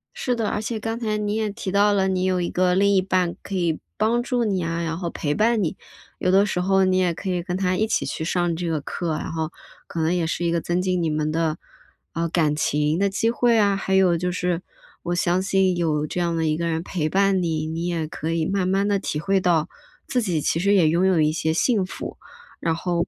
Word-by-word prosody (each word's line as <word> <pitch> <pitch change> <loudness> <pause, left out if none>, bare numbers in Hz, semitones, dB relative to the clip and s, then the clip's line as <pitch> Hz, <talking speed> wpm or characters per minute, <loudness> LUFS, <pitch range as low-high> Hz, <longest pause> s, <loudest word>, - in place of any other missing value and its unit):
是 255 - -1
的， 225 -3 -1
而 210 - -2
且 220 +1 -3
刚 225 +2 -3
才 215 -3 -1
你 210 0 -1
也 220 -1 0
提 200 -2 -5
到 205 +1 +4
了， 190 -1 +2
你 185 -1 0
有 185 -1 +1
一 175 - -1
个 180 0 +2
另 200 +1 +3
一 190 - +4
半 185 -2 0
可 200 - -6
以 170 -4 0 0.2
帮 225 +3 +2
助 245 0 0
你 195 -5 0
啊， 165 0 -2
然 165 0 -2
后 175 -1 -3
陪 145 -3 -2
伴 220 +3 +2
你。 160 - -2 0.4
有 185 - 0
的 195 +2 +5
时 190 - -2
候， 190 +1 +3
你 185 0 +2
也 180 -2 +2
可 190 +3 -5
以 180 -1 0
跟 180 +1 -4
他 185 -1 +1
一 220 - +1
起 - - 0
去 - - -4
上 175 0 0
这 175 +1 -3
个 155 -2 -1
课， 165 +3 -3
然 - - -5
后， 160 0 -3 0.4
可 165 - -4
能 160 +2 +1
也 175 -2 0
是 170 +1 -2
一 170 - +1
个 170 - +1
增 175 +2 -1
进 185 -1 0
你 165 - 0
们 155 0 -1
的 160 0 0 0.6
呃， 165 0 -1
感 155 -3 +1
情 150 +2 +1
的 200 0 +2
机 225 +4 +1
会 235 -1 +3
啊。 200 -2 +3
还 190 0 -1
有 185 -3 +4
就 180 +2 -1
是， 180 -1 -1 0.4
我 175 0 -1
相 175 +1 +1
信 190 -1 +2
有 155 -3 0
这 165 - -4
样 170 -1 0
的 165 -1 0
一 155 0 +1
个 170 0 -1
人 165 0 -1
陪 170 -4 -2
伴 195 +1 +2
你， 160 -3 -1
你 165 +2 -3
也 170 -2 -1
可 155 +1 -4
以 165 -1 0
慢 190 0 0
慢 195 +2 +1
地 200 -1 +1
体 155 - -3
会 195 +4 +1
到， 175 -3 +1 0.4
自 255 -2 0
己 175 -8 -1
其 165 - 0
实 200 +3 +3
也 175 -6 +5
拥 170 +4 +2
有 180 -4 +3
一 150 0 +3
些 160 0 -1
幸 200 +3 +2
福， - - -7 0.4
然 165 -1 0
后 170 0 -1
180 Hz, 275 characters per minute, -23 LUFS, 165-195 Hz, 0.6 s, 的